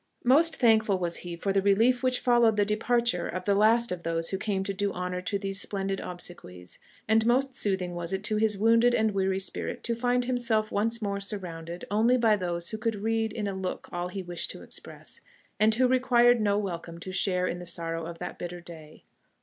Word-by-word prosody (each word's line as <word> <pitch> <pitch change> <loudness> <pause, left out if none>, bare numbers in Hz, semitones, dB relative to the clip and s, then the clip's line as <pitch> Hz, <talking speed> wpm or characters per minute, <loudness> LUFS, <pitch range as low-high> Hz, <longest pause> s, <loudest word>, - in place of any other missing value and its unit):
Most 310 +7 +4
thankful 220 -4 +3
was 175 -2 -2
he 175 -1 -6
for 195 +3 -2
the 195 - +3
relief 225 +6 +3
which 255 -1 +1
followed 240 -3 +4
the 205 - +3
departure 225 -3 +1
of 185 - -5
the 200 - +3
last 225 +3 +3
of 180 -1 -3
those 165 0 -1
who 190 - -2
came 195 -2 -1
to 200 - -3
do 200 +1 -1
honour 180 0 -4
to 200 +2 -2
these 195 0 -2
splendid 195 -1 -2
obsequies; 135 - -7 0.3
and 220 +1 +4
most 260 +3 +2
soothing 190 -6 -1
was 175 0 -4
it 190 +1 -2
to 215 +1 0
his 215 -1 +1
wounded 230 +3 +4
and 220 -1 +2
weary 190 -1 0
spirits 195 - -4
to 235 - 0
find 245 +1 0
himself 235 -4 0
once 225 +2 0
more 200 -1 -2
surrounded 175 -4 -5
only 230 +5 +3
by 225 -3 +4
those 175 -3 -3
who 220 - -5
could 225 0 -1
read 220 +1 -1
in 210 -2 -3
a 200 - -2
look 190 -1 -5
all 175 0 -3
he 190 +1 -6
wished 175 -1 -5
to - - -8
express, - - -9 0.4
and 220 +1 +4
who 255 +2 +3
required 245 -2 +4
no 205 -1 +2
welcome 170 -4 -4
to 185 +2 -7
share 185 -1 +1
in 175 - -3
the 175 - -8
sorrow 165 -1 -3
of 170 0 -8
that - - -7
bitter 175 0 -6
day. 160 -3 -13
200 Hz, 215 wpm, -28 LUFS, 180-230 Hz, 0.4 s, Most